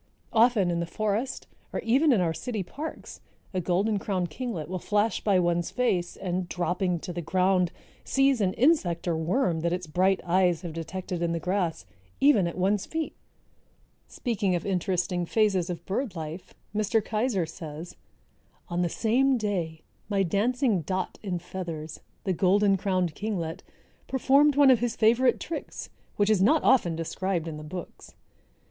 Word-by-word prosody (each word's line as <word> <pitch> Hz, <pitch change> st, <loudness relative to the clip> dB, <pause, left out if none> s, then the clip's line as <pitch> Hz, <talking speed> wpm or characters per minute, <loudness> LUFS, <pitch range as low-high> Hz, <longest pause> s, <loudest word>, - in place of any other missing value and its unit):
Often 225 Hz, -5 st, +4 dB
in 170 Hz, -, -1 dB
the 170 Hz, -, -2 dB
forest 215 Hz, +7 st, -2 dB, 0.3 s
or -, -, -2 dB
even 270 Hz, +7 st, +3 dB
in 220 Hz, -7 st, +4 dB
our 165 Hz, -2 st, +1 dB
city 220 Hz, +2 st, -3 dB
parks 300 Hz, -, -8 dB, 0.3 s
a 185 Hz, -, 0 dB
Golden 195 Hz, +5 st, +1 dB
crowned 185 Hz, -4 st, -2 dB
Kinglet 205 Hz, -, -4 dB
will 185 Hz, +2 st, -4 dB
flash 210 Hz, +2 st, 0 dB
by 200 Hz, -3 st, +3 dB
one's 175 Hz, -1 st, +1 dB
face 195 Hz, -9 st, 0 dB
and, 180 Hz, -1 st, -3 dB
dropping 180 Hz, 0 st, -1 dB
to 180 Hz, -, -6 dB
the 175 Hz, -, -3 dB
ground, 180 Hz, +1 st, +2 dB, 0.3 s
seize 270 Hz, -3 st, +2 dB
an 190 Hz, -2 st, +1 dB
insect 225 Hz, -, +2 dB
or 170 Hz, -, +1 dB
worm 170 Hz, +2 st, 0 dB
that 170 Hz, +1 st, 0 dB
its 180 Hz, 0 st, -2 dB
bright 185 Hz, +4 st, +2 dB
eyes 175 Hz, -2 st, +2 dB
have 170 Hz, -3 st, -5 dB
detected 175 Hz, +2 st, -5 dB
in 170 Hz, -1 st, 0 dB
the 165 Hz, -, -1 dB
grass, 180 Hz, -, -1 dB, 0.3 s
even 245 Hz, -11 st, +5 dB
at 170 Hz, -, -5 dB
one's 190 Hz, +2 st, +1 dB
feet. 320 Hz, -1 st, -3 dB, 0.9 s
Speaking 205 Hz, -7 st, -1 dB
of 170 Hz, -, -3 dB
interesting 180 Hz, -2 st, -1 dB
phases 195 Hz, -5 st, +2 dB
of 175 Hz, -, -5 dB
bird 205 Hz, 0 st, -2 dB
life, 160 Hz, +2 st, -7 dB, 0.2 s
Mr. 215 Hz, +2 st, +2 dB
Keyser 215 Hz, -3 st, 0 dB
says, 160 Hz, +1 st, -8 dB, 0.7 s
"On 175 Hz, 0 st, -1 dB
the 175 Hz, -, +1 dB
same 255 Hz, +7 st, +2 dB
day 175 Hz, -8 st, -3 dB, 0.3 s
my 200 Hz, -2 st, +2 dB
dancing 220 Hz, -, +1 dB
dot 185 Hz, +4 st, -3 dB
in 190 Hz, -4 st, -2 dB
feathers, 170 Hz, -3 st, -6 dB, 0.2 s
the 190 Hz, -, 0 dB
Golden 195 Hz, +3 st, +3 dB
crowned 185 Hz, -4 st, 0 dB
Kinglet, 185 Hz, -4 st, -3 dB, 0.5 s
performed 275 Hz, +2 st, +4 dB
one 280 Hz, -2 st, +7 dB
of 250 Hz, -, +4 dB
his 240 Hz, -1 st, -1 dB
favorite 235 Hz, +3 st, +3 dB
tricks, 330 Hz, -, -6 dB, 0.3 s
which 205 Hz, +1 st, +2 dB
is 205 Hz, -4 st, +3 dB
not 295 Hz, +11 st, +4 dB
often 175 Hz, -10 st, +4 dB
described 170 Hz, +1 st, -2 dB
in 155 Hz, -2 st, -5 dB
the 150 Hz, -, -8 dB
books. 175 Hz, +3 st, -9 dB
185 Hz, 165 wpm, -27 LUFS, 175-220 Hz, 0.9 s, one